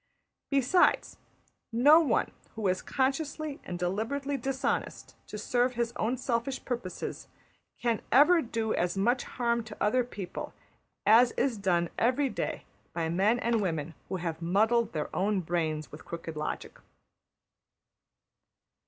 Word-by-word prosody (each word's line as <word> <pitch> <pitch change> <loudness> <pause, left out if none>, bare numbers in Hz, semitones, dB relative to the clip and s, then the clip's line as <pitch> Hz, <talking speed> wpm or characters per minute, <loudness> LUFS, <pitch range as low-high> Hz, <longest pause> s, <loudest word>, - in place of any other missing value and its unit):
Besides, 280 +6 +3 0.5
no 285 +8 +7
one 285 -9 +1 0.2
who 220 -3 -1
is 185 0 +1
consciously 285 +2 -1
and 175 - -5
deliberately 225 +11 -2
dishonest 270 +1 -2
to - - -6
serve 245 +1 +1
his 235 0 -1
own 235 +4 0
selfish 255 +1 -2
purposes 235 -8 -4 0.5
can 235 -3 0
ever 325 +6 +6
do 225 -4 -2
as 175 +2 0
much 240 +6 +2
harm 235 -1 -1
to 215 -1 -9
other 250 +5 +2
people 205 -6 -7 0.5
as 235 +3 +6
is 265 -4 0
done 175 -4 0
every 260 +4 +2
day - - -4 0.3
by 165 -2 -1
men 195 +7 +3
and 235 -2 +1
women 165 -4 -2 0.2
who - - -2
have 170 -2 -4
muddled 220 +7 +2
their 150 -2 -3
own 200 +1 +1
brains 160 -3 -2
with 150 - -10
crooked 165 -1 -7
logic. 150 0 -5
230 Hz, 135 wpm, -29 LUFS, 180-255 Hz, 0.5 s, no